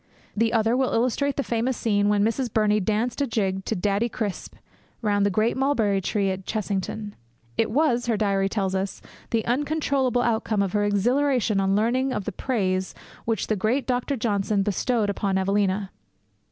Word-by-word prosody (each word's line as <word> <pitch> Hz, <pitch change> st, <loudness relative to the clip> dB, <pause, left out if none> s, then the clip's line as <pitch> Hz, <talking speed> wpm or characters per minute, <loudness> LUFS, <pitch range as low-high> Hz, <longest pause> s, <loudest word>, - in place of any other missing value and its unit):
The 225 Hz, +1 st, +2 dB
other 225 Hz, 0 st, +2 dB
will 260 Hz, 0 st, +1 dB
illustrate 255 Hz, +4 st, +1 dB
the 280 Hz, -, +1 dB
famous 240 Hz, +1 st, -1 dB
scene 205 Hz, -2 st, +1 dB
when 205 Hz, -1 st, +3 dB
Miss 235 Hz, +3 st, 0 dB
Burney 215 Hz, -1 st, +2 dB
danced 220 Hz, +6 st, -1 dB
a 280 Hz, -, +1 dB
jig 195 Hz, -4 st, -1 dB
to -, -, -1 dB
Daddy 205 Hz, +5 st, 0 dB
Crisp 210 Hz, -5 st, -4 dB, 0.5 s
round 205 Hz, -1 st, +2 dB
the -, -, +2 dB
great 215 Hz, +4 st, +1 dB
mulberry 230 Hz, -8 st, +1 dB
tree 195 Hz, 0 st, 0 dB
at 190 Hz, 0 st, -5 dB
Chessington. 205 Hz, 0 st, -3 dB, 0.4 s
It 225 Hz, -, +1 dB
was, 245 Hz, -1 st, +1 dB
her 230 Hz, -3 st, +1 dB
diary 195 Hz, -2 st, +1 dB
tells 195 Hz, -2 st, -1 dB
us, 190 Hz, +1 st, -3 dB, 0.3 s
the 225 Hz, -1 st, 0 dB
uncontrollable 270 Hz, -2 st, +1 dB
outcome 220 Hz, -3 st, +1 dB
of 190 Hz, -, -3 dB
her 205 Hz, -1 st, +2 dB
exhilaration 240 Hz, +2 st, +2 dB
on 195 Hz, 0 st, +2 dB
learning 255 Hz, +5 st, +1 dB
of 200 Hz, -, -3 dB
the -, -, -2 dB
praise 190 Hz, -4 st, -1 dB, 0.3 s
which 225 Hz, -3 st, 0 dB
the 215 Hz, -, 0 dB
great 220 Hz, +7 st, 0 dB
Dr. 250 Hz, +2 st, -1 dB
Johnson 205 Hz, -2 st, 0 dB
bestowed 210 Hz, +2 st, 0 dB
on 195 Hz, -2 st, +1 dB
Evelina. 195 Hz, 0 st, 0 dB
215 Hz, 175 wpm, -25 LUFS, 200-245 Hz, 0.5 s, when